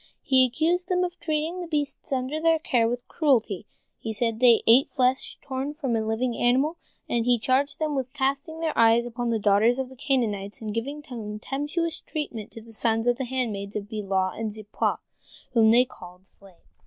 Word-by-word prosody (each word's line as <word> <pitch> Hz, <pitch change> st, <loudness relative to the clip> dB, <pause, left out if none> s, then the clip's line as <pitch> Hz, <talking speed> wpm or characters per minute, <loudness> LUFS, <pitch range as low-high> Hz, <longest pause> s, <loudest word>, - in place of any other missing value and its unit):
He 260 Hz, -1 st, +5 dB
accused 340 Hz, +8 st, 0 dB
them 365 Hz, -1 st, +2 dB
of 360 Hz, 0 st, -4 dB
treating 320 Hz, +2 st, -2 dB
the 350 Hz, -, -5 dB
beasts 295 Hz, -4 st, -2 dB
under 265 Hz, +4 st, -1 dB
their 330 Hz, 0 st, +4 dB
care 240 Hz, -7 st, +1 dB
with 245 Hz, 0 st, -4 dB
cruelty—he 225 Hz, -, -1 dB
said 230 Hz, +1 st, +1 dB
that 220 Hz, -, -11 dB
they 240 Hz, -3 st, +6 dB
ate 245 Hz, +5 st, +6 dB
flesh 255 Hz, +1 st, 0 dB
torn 270 Hz, +2 st, -4 dB
from 270 Hz, -7 st, -1 dB
a 220 Hz, -, 0 dB
living 230 Hz, +2 st, -1 dB
animal—and 250 Hz, -2 st, 0 dB
he 245 Hz, 0 st, +4 dB
charged 260 Hz, +5 st, +1 dB
them 310 Hz, -1 st, -1 dB
with 260 Hz, -2 st, -2 dB
casting 280 Hz, +4 st, -2 dB
their 320 Hz, -2 st, -1 dB
eyes 230 Hz, +1 st, +5 dB
upon 240 Hz, 0 st, -3 dB
the 230 Hz, -, +1 dB
daughters 215 Hz, +4 st, +3 dB
of 265 Hz, -1 st, -3 dB
the 260 Hz, -, -13 dB
Canaanites, 230 Hz, -8 st, -1 dB
and 215 Hz, -2 st, -5 dB
giving 280 Hz, +7 st, -4 dB
contemptuous 275 Hz, +7 st, -3 dB
treatment 245 Hz, -9 st, -5 dB
to 225 Hz, -, -11 dB
the 230 Hz, 0 st, -13 dB
sons 225 Hz, 0 st, 0 dB
of 245 Hz, -1 st, +2 dB
the 265 Hz, -, -1 dB
handmaids 225 Hz, -6 st, -3 dB
Bilhah 200 Hz, -3 st, -2 dB
and 220 Hz, -1 st, -2 dB
Zilpah, 215 Hz, 0 st, -2 dB, 0.6 s
whom 225 Hz, -2 st, +5 dB
they 240 Hz, +3 st, +6 dB
called 180 Hz, -6 st, -14 dB
slaves. 190 Hz, -2 st, -18 dB
245 Hz, 185 wpm, -26 LUFS, 220-285 Hz, 0.6 s, they